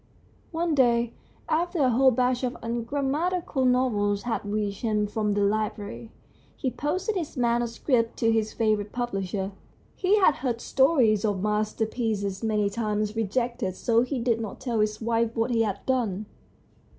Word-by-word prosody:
One 335 Hz, 0 st, -1 dB
day, 240 Hz, -4 st, +3 dB, 0.3 s
after 345 Hz, +3 st, 0 dB
a 265 Hz, -5 st, +3 dB
whole 260 Hz, +3 st, +5 dB
batch 250 Hz, +1 st, +1 dB
of 250 Hz, -1 st, 0 dB
ungram 240 Hz, +4 st, -2 dB
matical 330 Hz, -4 st, 0 dB
novels 210 Hz, -6 st, +1 dB
had 240 Hz, -2 st, -2 dB
reached 205 Hz, -1 st, -2 dB
him 215 Hz, -3 st, +1 dB
from 210 Hz, -1 st, -1 dB
the 205 Hz, -, +1 dB
library, 215 Hz, +1 st, -2 dB, 0.5 s
he 260 Hz, -, -1 dB
posted 370 Hz, -, -2 dB
his 330 Hz, -6 st, -4 dB
manuscript 235 Hz, 0 st, +1 dB
to 225 Hz, -1 st, +2 dB
his 220 Hz, -1 st, +1 dB
favourite 215 Hz, -2 st, 0 dB
publisher. 195 Hz, -5 st, -2 dB, 0.4 s
He 390 Hz, +2 st, +3 dB
had 370 Hz, -7 st, +4 dB
heard 240 Hz, -2 st, -2 dB
stories 255 Hz, -7 st, +3 dB
of 205 Hz, -3 st, 0 dB
masterpieces 210 Hz, -1 st, -1 dB
many 210 Hz, -2 st, +1 dB
times 210 Hz, 0 st, -1 dB
rejected, 225 Hz, -3 st, -1 dB
so 230 Hz, +3 st, +2 dB
he 255 Hz, +1 st, -2 dB
did 230 Hz, -1 st, +1 dB
not 215 Hz, -3 st, -6 dB
tell 240 Hz, -4 st, -2 dB
his 215 Hz, 0 st, 0 dB
wife 230 Hz, 0 st, 0 dB
what 225 Hz, +2 st, +1 dB
he 230 Hz, -1 st, +2 dB
had 205 Hz, -3 st, -2 dB
done. 220 Hz, -6 st, 0 dB
230 Hz, 155 wpm, -26 LUFS, 210-255 Hz, 0.5 s, whole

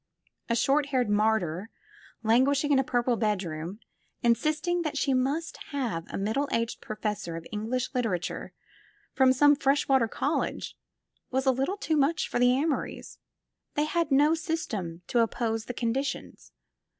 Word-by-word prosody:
A 235 Hz, -, +2 dB
short 275 Hz, +4 st, +2 dB
haired 255 Hz, -6 st, +1 dB
martyr, 210 Hz, -3 st, +1 dB, 0.5 s
languishing 270 Hz, +6 st, +3 dB
in 275 Hz, -, +5 dB
a -, -, +3 dB
purple 245 Hz, -1 st, +1 dB
bedroom, 185 Hz, -4 st, -2 dB, 0.4 s
insisting 310 Hz, +9 st, +1 dB
that 310 Hz, -3 st, -2 dB
she 280 Hz, -1 st, +1 dB
must 280 Hz, +6 st, 0 dB, 0.2 s
have 230 Hz, -12 st, -2 dB
a -, -, -4 dB
middle 220 Hz, +9 st, -1 dB
aged 230 Hz, 0 st, -1 dB
professor 210 Hz, -5 st, -4 dB
of 165 Hz, 0 st, -7 dB
English 235 Hz, +5 st, -2 dB
liter 245 Hz, -3 st, 0 dB
ature 180 Hz, -2 st, -3 dB, 0.6 s
from 265 Hz, -1 st, +5 dB
some 290 Hz, +3 st, +5 dB
fresh 275 Hz, 0 st, +1 dB
water 265 Hz, -4 st, +4 dB
college, -, -, -2 dB, 0.5 s
was 265 Hz, +1 st, 0 dB
a 265 Hz, -, +5 dB
little 270 Hz, +10 st, -1 dB
too 320 Hz, -6 st, 0 dB
much 295 Hz, +4 st, +2 dB
for -, -, -2 dB
the 245 Hz, 0 st, +5 dB
Amorys; 285 Hz, +3 st, -2 dB, 0.6 s
they 295 Hz, -, +2 dB
had 335 Hz, 0 st, 0 dB
no 290 Hz, +3 st, +5 dB
system 210 Hz, -, -3 dB
to 240 Hz, -, +1 dB
oppose 225 Hz, -1 st, 0 dB
to -, -, -30 dB
the 245 Hz, -, -3 dB
conditions. 265 Hz, +4 st, -3 dB
255 Hz, 155 wpm, -28 LUFS, 220-285 Hz, 0.6 s, in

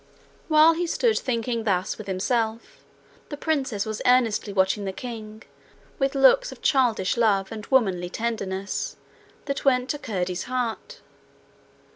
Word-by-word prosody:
While 310 Hz, +1 st, +6 dB
he 345 Hz, +1 st, -2 dB
stood 450 Hz, +6 st, +1 dB
thinking 235 Hz, -2 st, -2 dB
thus 190 Hz, -1 st, -1 dB
with 215 Hz, -, -8 dB
himself, 220 Hz, +4 st, -2 dB, 0.5 s
the 290 Hz, -, -6 dB
princess 270 Hz, -10 st, -1 dB
was 220 Hz, -1 st, -4 dB
earnestly 235 Hz, -4 st, +2 dB
watching 195 Hz, +1 st, +1 dB
the 195 Hz, -, -3 dB
king, 220 Hz, 0 st, -8 dB, 0.6 s
with 270 Hz, 0 st, 0 dB
looks -, -, +5 dB
of -, -, -13 dB
childish 240 Hz, -7 st, +2 dB
love 200 Hz, -4 st, +2 dB
and 220 Hz, -1 st, -7 dB
womanly 190 Hz, -9 st, +2 dB
tenderness 200 Hz, -3 st, -3 dB, 0.5 s
that 275 Hz, -, -3 dB
went 255 Hz, -2 st, +2 dB
to 295 Hz, -, -4 dB
Curdie's 180 Hz, -6 st, -3 dB
heart. 255 Hz, -, -4 dB
230 Hz, 135 wpm, -25 LUFS, 200-265 Hz, 0.6 s, While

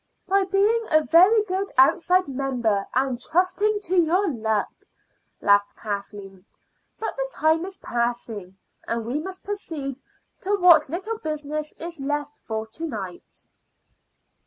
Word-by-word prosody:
"By 390 Hz, +1 st, +3 dB
being 410 Hz, +4 st, +2 dB
a 310 Hz, -1 st, +4 dB
very 375 Hz, +8 st, +6 dB
good 390 Hz, 0 st, -3 dB
outside 360 Hz, +7 st, +4 dB
member, 250 Hz, -7 st, -1 dB
and 260 Hz, -1 st, 0 dB
trusting 395 Hz, +7 st, +1 dB
to 375 Hz, -2 st, -1 dB
your 355 Hz, +4 st, +3 dB
luck," 220 Hz, -4 st, -1 dB, 0.7 s
laughed 205 Hz, 0 st, +3 dB
Kathleen. 200 Hz, -2 st, -6 dB, 0.6 s
"But 445 Hz, -, -3 dB
the -, -, -3 dB
time 320 Hz, -1 st, +2 dB
is 385 Hz, 0 st, -8 dB
passing, 235 Hz, -5 st, -3 dB, 0.3 s
and 230 Hz, -1 st, -2 dB
we 250 Hz, +6 st, -2 dB
must 375 Hz, +3 st, -7 dB
proceed 295 Hz, -10 st, -5 dB, 0.4 s
to 400 Hz, +2 st, 0 dB
what 345 Hz, -7 st, +6 dB
little 425 Hz, +8 st, -4 dB
business 305 Hz, 0 st, -4 dB
is 335 Hz, -1 st, -7 dB
left 290 Hz, +1 st, -3 dB
for 220 Hz, -1 st, -4 dB
to 225 Hz, +9 st, -8 dB
night." 195 Hz, -, -7 dB
305 Hz, 135 wpm, -24 LUFS, 235-375 Hz, 0.7 s, very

